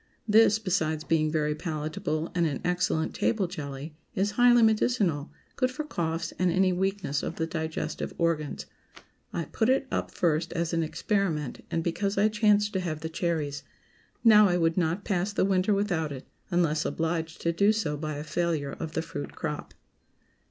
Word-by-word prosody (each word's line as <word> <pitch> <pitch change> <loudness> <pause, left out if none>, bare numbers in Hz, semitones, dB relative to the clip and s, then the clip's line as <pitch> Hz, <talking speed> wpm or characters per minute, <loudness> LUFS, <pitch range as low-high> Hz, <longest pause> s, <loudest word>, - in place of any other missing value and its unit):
This, 215 0 +6
besides 160 -7 -1
being 155 -1 +2
very 150 -1 +1
palatable 155 +1 -3
and 170 -2 +2
an 140 -4 -3
excellent 180 -2 0
table 215 -4 +1
jelly, 150 -4 -6 0.2
is 200 +2 +1
highly 240 +1 +5
medicinal, 210 - +2 0.2
good 255 -1 +1
for 255 +4 -4
coughs 165 - -3
and 180 -1 +3
any 185 +1 +3
weakness 190 -5 -1
of 165 - -4
the 160 - -1
digestive 160 -1 -3
organs. 165 -3 -1 0.7
I 170 - -3
put 220 - 0
it 265 +1 +3
up - - -1
first 165 -1 0
as 170 0 -1
an 165 - +2
experiment, 160 - -1
and 165 - -1
because 195 +4 -1
I 210 +2 +4
chanced 210 -1 +3
to 190 - 0
have 160 -4 -3
the 160 - -4
cherries. 155 -4 -2 0.6
Now 215 -3 +8
I 175 - +2
would 165 -1 +2
not 175 +2 0
pass 195 +1 0
the 205 - +2
winter 190 +1 +2
without 185 -7 0
it, 130 -2 -7 0.2
unless 165 -4 +1
obliged 165 0 -2
to 170 - +1
do 200 +5 +4
so 210 -9 -1
by 155 0 -4
a 145 - -5
failure 155 -3 -1
of 160 +2 -6
the 160 - -1
fruit 145 -3 -6
crop. 150 -1 -4
170 Hz, 175 wpm, -28 LUFS, 155-200 Hz, 0.7 s, Now